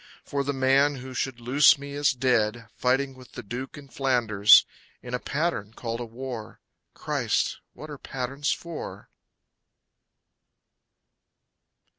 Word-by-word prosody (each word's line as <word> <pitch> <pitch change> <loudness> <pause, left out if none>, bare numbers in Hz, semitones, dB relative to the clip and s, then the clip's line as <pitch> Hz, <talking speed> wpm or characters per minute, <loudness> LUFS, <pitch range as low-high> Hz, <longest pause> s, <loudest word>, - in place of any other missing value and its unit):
For 140 -1 -1
the 140 - -1
man 135 +2 +3
who 130 0 -8
should 130 -1 -3
loose 135 +5 +5
me 140 0 -8
is 145 0 +2
dead, 120 -3 +1
Fighting 135 +2 +1
with 130 -1 -16
the - - -7
Duke 125 +7 -6
in 145 -1 -11
Flanders, 115 -6 +5 0.4
In 125 - -8
a 125 - 0
pattern 140 -10 -2
called 115 -1 -4
a 120 - -4
war. 120 -1 -7 0.4
Christ! - - -1
What 155 0 -10
are 145 - -8
patterns 135 +3 -3
for? 170 -2 -6
130 Hz, 130 wpm, -26 LUFS, 120-140 Hz, 0.4 s, loose